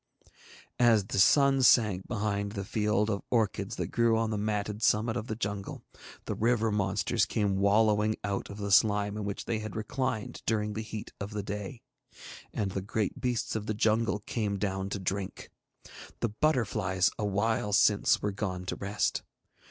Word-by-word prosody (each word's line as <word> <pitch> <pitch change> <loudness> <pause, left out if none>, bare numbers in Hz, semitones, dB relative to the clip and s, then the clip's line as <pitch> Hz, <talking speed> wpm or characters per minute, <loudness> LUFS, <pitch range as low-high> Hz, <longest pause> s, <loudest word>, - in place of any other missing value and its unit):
As 115 -5 +5
the 100 - -2
sun 140 +6 +5
sank 110 -7 +4
behind 100 -2 -2
the 100 -2 -4
field 105 -1 +1
of 100 - -2
orchids 110 -2 0
that - - -3
grew 115 -1 +3
on 115 0 0
the - - -1
matted 105 0 -2
summit 110 +1 +2
of 120 -1 -4
the 110 - -3
jungle, 100 -3 -4 0.4
the - - -2
river 115 -1 +1
monsters 100 +2 +1
came 100 -4 0
wallowing 105 +1 +3
out 100 -1 -3
of 100 - -8
the 100 -1 -3
slime 105 0 +4
in 105 -1 -4
which 100 -1 -4
they 110 - -1
had 110 -1 -6
reclined 110 0 -3
during 105 -1 0
the 110 - -3
heat 110 -1 -7
of 100 - -4
the 105 -1 -3
day, 105 +3 -6 0.7
and 100 -3 -2
the 95 - -3
great 105 +1 -2
beasts 120 -3 -1
of 110 -1 -3
the 110 - -1
jungle 110 0 +1
came 105 -2 -2
down 95 -1 -2
to 100 - -3
drink. 95 0 -4 0.7
The 115 - +1
butterflies 105 -7 +1
a 105 - 0
while 105 +1 0
since 105 0 +3
were 105 - 0
gone 95 -3 -4
to - - -3
rest. 100 +1 -1
105 Hz, 175 wpm, -29 LUFS, 100-110 Hz, 0.7 s, As